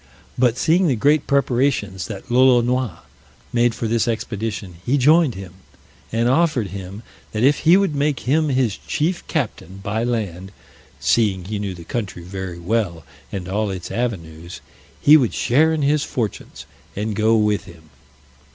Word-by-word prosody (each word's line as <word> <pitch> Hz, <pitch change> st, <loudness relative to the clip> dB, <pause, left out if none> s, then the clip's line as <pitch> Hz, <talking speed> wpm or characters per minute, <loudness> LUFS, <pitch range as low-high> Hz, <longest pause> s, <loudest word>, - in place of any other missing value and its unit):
But 125 Hz, -1 st, +2 dB
seeing 170 Hz, +5 st, +3 dB
the 135 Hz, -, +2 dB
great 145 Hz, +6 st, +2 dB
preparations 125 Hz, -8 st, 0 dB
that 105 Hz, +2 st, -8 dB
Lolonois 125 Hz, -4 st, +3 dB, 0.5 s
made 120 Hz, -1 st, +2 dB
for 115 Hz, -, -3 dB
this 115 Hz, +1 st, +1 dB
expedition, 110 Hz, -4 st, -4 dB
he 135 Hz, +4 st, +1 dB
joined 150 Hz, 0 st, +4 dB
him, 95 Hz, -2 st, -9 dB, 0.6 s
and 115 Hz, +1 st, +1 dB
offered 130 Hz, -, +2 dB
him, 100 Hz, +3 st, -8 dB, 0.3 s
that 110 Hz, +1 st, -1 dB
if 140 Hz, +2 st, +4 dB
he 165 Hz, +4 st, +5 dB
would 195 Hz, -5 st, +1 dB
make 145 Hz, -2 st, 0 dB
him 155 Hz, +4 st, +1 dB
his 130 Hz, -6 st, +1 dB
chief 170 Hz, +4 st, -2 dB
captain 110 Hz, -, -3 dB
by 110 Hz, +3 st, -1 dB
land 100 Hz, -6 st, -3 dB, 0.5 s
(seeing 95 Hz, +4 st, +1 dB
he 105 Hz, +1 st, -4 dB
knew 100 Hz, -2 st, -4 dB
the 85 Hz, -, -10 dB
country 95 Hz, -3 st, -5 dB
very 95 Hz, -1 st, -6 dB
well, 85 Hz, -3 st, -2 dB, 0.3 s
and 90 Hz, -2 st, -5 dB
all 105 Hz, +2 st, -1 dB
its 95 Hz, -2 st, -6 dB
avenues) 85 Hz, -8 st, -4 dB, 0.4 s
he 150 Hz, +2 st, +7 dB
would 125 Hz, -7 st, 0 dB
share 155 Hz, +7 st, +3 dB
in 155 Hz, -2 st, -1 dB
his 145 Hz, +1 st, +2 dB
fortunes, 115 Hz, -6 st, -5 dB, 0.3 s
and 105 Hz, +1 st, -3 dB
go 110 Hz, +1 st, +3 dB
with 105 Hz, -1 st, +1 dB
him. 80 Hz, -4 st, -16 dB
115 Hz, 160 wpm, -21 LUFS, 95-135 Hz, 0.6 s, he